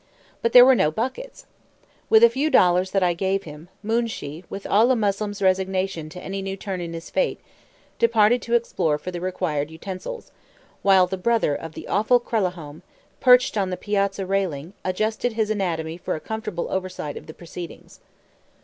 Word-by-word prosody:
But 230 - 0
there 245 0 +10
were 265 - +7
no 150 - +3
buckets. 260 - -5 0.6
With 220 0 +6
a 235 - +9
few 275 +6 0
dollars 180 - +4
that 195 -1 +1
I 175 -1 +3
gave 190 +2 -1
him, 155 +2 -11
Moonshee, 220 -8 -2
with 195 - -7
all 220 +5 +4
a 260 - +4
Moslem's 205 -2 -1
resignation 185 -3 0
to 180 - -9
any 195 +1 -4
new 195 0 -4
turn 190 -2 -5
in 170 -1 -5
his 165 0 -8
fate, - - 0 0.6
departed 230 0 +4
to 235 - 0
explore 175 -10 0
for 180 - -7
the 175 -1 -6
required 165 -5 -2
utensils, 185 - -7 0.5
while 190 -2 +5
the 190 +1 -4
brother 225 -5 +1
of 160 +2 -6
the - - -9
awful 220 +5 +3
Kralahome, 180 -10 -3 0.4
perched 250 -1 +5
on 190 -2 0
the 180 - -3
piazza 200 -2 -1
railing, 185 -4 -2
adjusted 215 +5 -1
his 220 -1 0
anatomy 165 -5 -2
for - - -3
a - - -5
comfortable 210 -3 -4
oversight 185 -6 -4
of - - -9
the 155 - -9
proceedings. 175 0 -10
195 Hz, 175 wpm, -23 LUFS, 175-220 Hz, 0.6 s, there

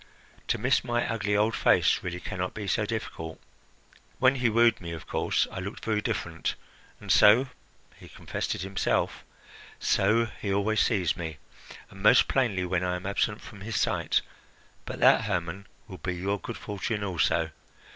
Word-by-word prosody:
To - - +1
miss - - +2
my 120 -1 0
ugly 105 -3 0
old 110 +2 +2
face - - +3
really 90 0 -4
can 90 - -6
not 90 0 -2
be 105 - -5
so 105 +2 0
difficult! 80 -7 -5 0.8
When 130 +2 +4
he 125 -2 +2
wooed 115 0 +3
me, 85 -1 -6
of 80 - -8
course - - 0
I - - -5
looked 100 +3 -7
very 110 -2 +1
different. 85 -8 -2 0.4
And - - -4
so 115 +6 +6 0.5
he - - -14
confessed - - -4
it - - -5
himself 95 -1 -1 0.6
so 110 +4 +3
he 105 -3 -5
always 100 +2 +1
sees 95 -7 +1
me, 80 -4 -5 0.5
and 95 - -12
most 105 +5 +6
plainly 105 -9 +1
when 90 0 0
I 90 0 0
am 90 - -7
absent 100 +1 -1
from 100 - -12
his 110 +1 -5
sight. - - +1 0.6
But - - -6
that, - - +6
Hermon, 90 +3 -3 0.2
will 95 -5 -10
be 90 +4 -3
your 100 +3 -2
good - - -7
fortune 105 +1 -3
also. 85 -3 +1
100 Hz, 175 wpm, -27 LUFS, 90-110 Hz, 0.8 s, so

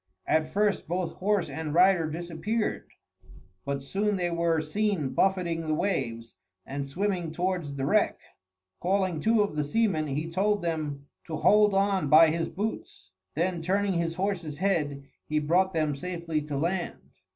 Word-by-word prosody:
At 155 0 +1
first 205 -1 +1
both 175 +1 -2
horse 200 0 +1
and 160 -1 -4
rider 180 -3 +5
disappeared; 175 +7 -3 0.8
but 140 -1 -2
soon 205 +8 0
they 175 -2 -1
were 170 -1 +1
seen 165 -1 -1
buffeting 180 -1 +1
the 155 - +1
waves, 115 - -2 0.3
and 140 +1 -4
swimming 180 +1 -2
towards 175 -4 -2
the 135 -1 -2
wreck. - - +2 0.6
Calling 185 -2 0
two 220 +3 +3
of 200 -7 -4
the 150 - 0
seamen, 160 -1 +1
he 150 +3 -2
told 200 +4 0
them 150 -4 -3 0.2
to 160 - -4
hold 210 +3 +4
on 195 -6 +2
by 155 +1 +7
his 165 0 -1
boots; 200 - -5 0.2
then 170 +2 0
turning 195 +3 +1
his 170 -1 -1
horse's 180 -6 -2
head, 150 -7 0 0.2
he 155 - 0
brought 175 +6 +2
them 155 -4 0
safely 170 0 -3
to 145 -1 -4
land. 175 +4 -3
170 Hz, 155 wpm, -28 LUFS, 155-195 Hz, 0.8 s, by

